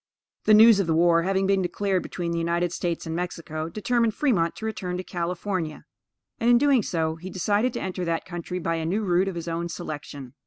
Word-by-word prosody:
The 215 - +7
news 220 -1 +8
of 185 -4 0
war 170 +1 +4
having 190 +2 +1
been 195 0 +2
declared 190 +1 0
between 170 -2 -4
the 170 - -1
United 170 +1 0
States 170 -2 -2
and 160 0 -4
Mexico, 165 -2 -4
determined 225 +3 0
Fremont 200 - +1
to 220 - -7
return 190 -5 -3
to 185 - -4
California; 175 -2 -3 0.5
and, 235 0 +2
in 240 - +7
doing 275 -1 +4
so, 160 -4 -1
he 180 +3 -8
decided 205 +7 +1
to - - -4
enter 185 -1 -3
that 165 -1 -1
country 175 0 -5
by 165 -1 -1
a 160 - -3
new 205 +6 0
route 185 0 +2
of 190 - -3
his 170 0 -5
own 170 +1 -2
selection. 145 -6 -7
180 Hz, 210 wpm, -25 LUFS, 165-200 Hz, 0.5 s, news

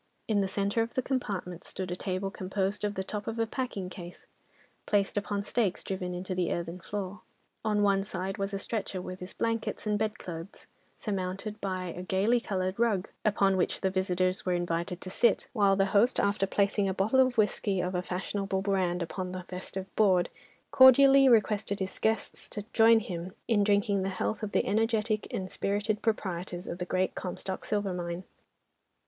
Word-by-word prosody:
In 210 -3 +2
the 195 - +1
centre 200 +3 0
of 230 +1 -3
the 260 - +1
compartment 195 -10 -3
stood 185 -2 -5
a - - -1
table 190 +1 -3
composed 195 +2 -2
of 205 -1 -1
the 190 - -2
top 205 +1 -5
of 225 - -3
a 225 - +2
packing 225 -5 -3
case, 180 -2 -10 0.6
placed 200 -2 +2
upon 205 0 -1
stakes 205 -3 0
driven 180 -2 -3
into 185 +1 -4
the 180 -2 0
earthen 170 +1 -3
floor. 200 +1 -5 0.4
At 215 -1 +1
one 200 -1 +3
side 190 0 -4
was 195 0 -1
a 200 - -2
stretcher 200 -2 -3
with 185 0 -6
his 180 +1 -8
blankets 230 -1 -2
and 210 -1 +1
bedclothes, 195 -4 -5 0.3
surmounted 200 +1 -3
by 185 -2 -2
a 180 - -5
gaily 195 +6 +2
coloured 185 -2 -2
rug, 215 -5 +1
upon 200 -2 +3
which 180 - 0
the 190 - +1
visitors 185 0 0
were 180 - 0
invited 175 0 -2
to 185 - -7
sit, 235 - +2
while 200 -4 +4
the 195 0 +3
host 230 +5 +4
after 200 -1 +2
placing 200 0 +1
a 190 - -2
bottle 215 +7 +2
of 255 -2 +4
whisky 205 -2 +1
of 180 +1 -1
a 180 - 0
fashionable 190 +1 -2
brand 185 -3 +1
upon 180 +2 -4
the 185 0 -5
festive 185 +1 -6
board, 190 -5 +4 0.4
cordially 270 +1 +8
requested 210 -3 +2
his 190 -1 -4
guests 220 0 0
to 210 -1 -5
join 225 0 +6
him 180 -4 -5
in 215 -4 +3
drinking 200 -1 +2
the 190 - -1
health 195 +3 -2
of 210 -2 -3
the - - +2
energetic 220 +1 +1
and 185 -1 -4
spirited 205 +1 -1
proprietors 180 -5 -2
of 170 - -5
the 180 - -2
Great 185 +1 0
Comstock 185 +1 -4
Silver 205 -3 -1
Mine. 175 0 -4
195 Hz, 185 wpm, -29 LUFS, 185-210 Hz, 0.6 s, cordially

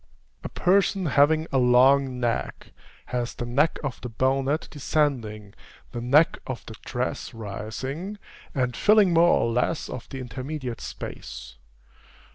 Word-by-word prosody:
A - - -5
person 195 +1 +2
having 155 +3 +3
a 135 - +2
long 130 +1 +4
neck 120 -2 -2 0.4
has 120 -1 -2
the 120 - -4
neck 140 +6 +2
of 135 -3 -4
the 125 - -5
bonnet 135 +6 0
descending, 125 -9 -1 0.4
the 120 - -5
neck 140 +7 +4
of 130 -2 -5
the 110 - -8
dress 125 -1 -3
rising, 130 - -5 0.4
and 125 -3 0
filling 210 -4 +5
more 170 +1 +5
or 115 - 0
less 125 +7 -1
of 120 - -7
the 135 - -6
intermediate 130 +1 -5
space. - - -8
130 Hz, 135 wpm, -25 LUFS, 120-150 Hz, 0.4 s, filling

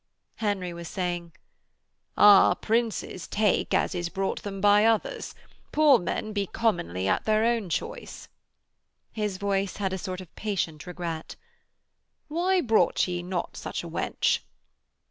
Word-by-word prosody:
Henry 200 -5 -2
was 170 0 -8
saying: 175 -2 -3 0.9
'Ah, 205 -2 +7
Princes 225 -5 -1
take 210 -2 +1
as - - +1
is 175 -1 -2
brought 195 +2 -2
them 195 -1 -6
by 205 +1 +5
others. 230 - 0 0.4
Poor 300 -4 +5
men 215 +4 -3
be 200 -2 -1
commonly 95 - -1
at - - +1
their 215 0 +3
own 230 -5 0
choice.' - - -5 0.8
His 210 -3 -2
voice 195 -1 -1
had 190 -2 -1
a 190 - -3
sort 185 -1 -5
of 185 -3 -12
patient 175 -8 -3
regret. 170 -2 -5 0.9
'Why 360 +4 +2
brought 220 - +2
ye 175 -1 -2
not 175 0 -4
such - - -5
a - - -7
wench?' - - 0
195 Hz, 140 wpm, -27 LUFS, 175-220 Hz, 0.9 s, Ah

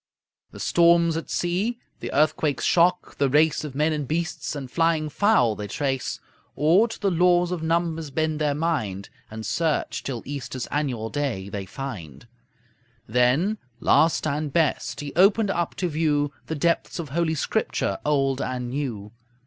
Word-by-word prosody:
The - - -12
storms 170 -1 +4
at 165 - -4
sea, 190 +7 -1 0.2
the - - -5
earthquake's 150 -3 +1
shock, 180 +1 +2
the 140 -1 +3
race 150 +3 +3
Of 145 -3 -7
men 155 +2 +2
and 150 -3 -3
beasts 165 0 -2
and 140 -2 -5
flying 165 -2 +1
fowl 150 - +3
they 105 0 -5
trace; 135 +3 -2 0.4
Or 175 +10 +4
to 225 - -8
the 195 - +1
laws 175 0 +3
of 180 -3 -2
numbers 165 -1 -1
bend 155 +2 -1
their 145 -2 +1
mind, 110 - -2 0.2
And 110 0 -7
search 165 -2 -1
till 125 -4 -5
Easter's 135 -3 -5
annual 125 -7 -2
day 125 -10 -2
they 100 -1 -5
find. 100 - -7 0.8
Then, 125 - +2 0.2
last 160 0 +3
and 150 0 -1
best, 155 -1 0
he 145 -1 -6
opened 200 +3 +4
up 170 -3 -2
to 180 - -1
view 150 -3 0
The 160 - -3
depths 170 +3 0
of 165 -5 -5
Holy 160 +2 0
Scripture, 100 -8 -1
Old 135 -2 +1
and 125 -1 -3
New. 120 -7 -4
150 Hz, 160 wpm, -24 LUFS, 135-170 Hz, 0.8 s, storms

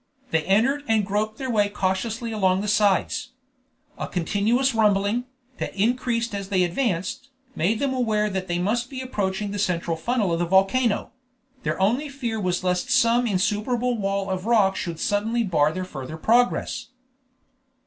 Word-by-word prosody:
They 160 - +2
entered 250 +9 +2
and 220 -2 +2
groped 215 +2 -1
their 260 -2 -3
way 205 -2 +2
cautiously 210 +4 -2
along 190 -3 +2
the 210 - -3
sides. 205 -3 +1 0.7
A - - -3
continuous 220 +9 +1
rumbling, 210 +2 +2 0.3
that - - -4
increased 235 +2 0
as 200 -1 -4
they 185 -3 +2
advanced, 190 +6 -2 0.3
made 200 +8 +1
them 275 +2 0
aware 220 -4 +1
that 190 -2 -3
they 175 -1 -1
must 230 +7 0
be 265 - -6
approaching 205 -5 -2
the 205 - -4
central 170 -4 0
funnel 205 +1 0
of 165 - 0
the 175 - +1
volcano; 195 +5 +2 0.5
their - - -2
only 240 +10 +1
fear 240 -5 -3
was 180 -2 -1
lest 180 +2 0
some 245 -1 +3
insuperable 220 +5 0
wall 195 -2 -1
of 185 +2 -3
rock 205 -5 +4
should 170 -4 -4
suddenly 225 +3 0
bar 155 -7 +2
their 185 +2 -4
further 150 -2 -7
progress. 240 +8 +1
210 Hz, 160 wpm, -24 LUFS, 190-235 Hz, 0.7 s, rock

